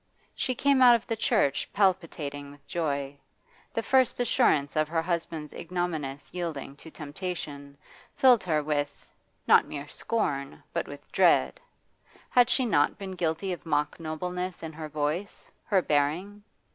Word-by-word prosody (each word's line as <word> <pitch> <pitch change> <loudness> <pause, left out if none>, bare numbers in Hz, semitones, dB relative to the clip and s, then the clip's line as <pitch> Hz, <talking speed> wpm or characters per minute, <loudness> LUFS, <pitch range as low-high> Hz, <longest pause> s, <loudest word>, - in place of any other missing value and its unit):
She 255 - -2
came 275 +1 +3
out 245 -1 +9
of 230 - -3
the 230 - -2
church 210 - +1
palpitating 160 -7 0
with 145 0 -16
joy; 140 -4 -2 0.5
the 230 - -2
first 260 -1 +3
assurance 155 - +2
of 155 0 +2
her 165 +1 -1
husband's 165 -3 -3
ignominious 165 -6 -3
yielding 160 -6 -4
to 160 - -12
temptation 145 -3 -6 0.4
filled 250 -4 +5
her 155 -4 +1
with, 145 -1 -2 0.4
not - - +6
mere 145 0 -6
scorn, 140 - -2
but - - -1
with - - -11
dread. 65 -1 +3 0.7
Had 245 -1 +5
she 260 - +3
not 145 -11 +2
been 195 -2 -6
guilty 180 +1 -1
of 175 - -8
mock 150 -1 -1
nobleness 180 +3 -4
in 160 -1 -6
her 155 0 -7
voice, 155 +6 -3
her 195 -4 +2
bearing? 160 +9 0
165 Hz, 145 wpm, -28 LUFS, 145-195 Hz, 0.7 s, out